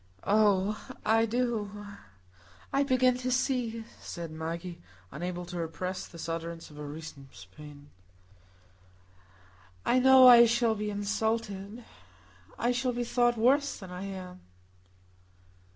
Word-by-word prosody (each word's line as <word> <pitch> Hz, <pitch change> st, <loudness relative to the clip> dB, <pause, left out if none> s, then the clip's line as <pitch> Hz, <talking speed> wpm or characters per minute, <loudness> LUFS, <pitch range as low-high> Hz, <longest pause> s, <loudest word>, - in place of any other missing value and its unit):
"Oh, 205 Hz, 0 st, +2 dB, 0.2 s
I 225 Hz, +1 st, +3 dB
do,—I 200 Hz, -, -5 dB
begin 255 Hz, -2 st, +3 dB
to 255 Hz, 0 st, -2 dB
see," 245 Hz, -3 st, -1 dB, 0.2 s
said 170 Hz, -2 st, -7 dB
Maggie, 165 Hz, +2 st, -6 dB, 0.3 s
unable 175 Hz, +4 st, -5 dB
to 175 Hz, 0 st, -6 dB
repress 180 Hz, +3 st, -4 dB
this 170 Hz, -1 st, -8 dB
utterance 165 Hz, 0 st, -5 dB
of 150 Hz, -, -14 dB
her 150 Hz, -1 st, -6 dB
recent 145 Hz, -2 st, -9 dB, 0.3 s
pain. 145 Hz, -1 st, -13 dB, 1.9 s
"I 255 Hz, -, +3 dB
know 260 Hz, 0 st, +8 dB
I 235 Hz, -1 st, +9 dB
shall 235 Hz, 0 st, +2 dB
be 210 Hz, -1 st, -3 dB
insulted. 210 Hz, +1 st, -3 dB, 0.7 s
I 240 Hz, +2 st, +1 dB
shall 250 Hz, 0 st, -1 dB
be 240 Hz, 0 st, -2 dB
thought 240 Hz, 0 st, +1 dB
worse 275 Hz, +5 st, +2 dB
than 190 Hz, -3 st, -10 dB
I 180 Hz, +2 st, -6 dB
am." 185 Hz, -2 st, -8 dB
205 Hz, 120 wpm, -29 LUFS, 170-240 Hz, 1.9 s, I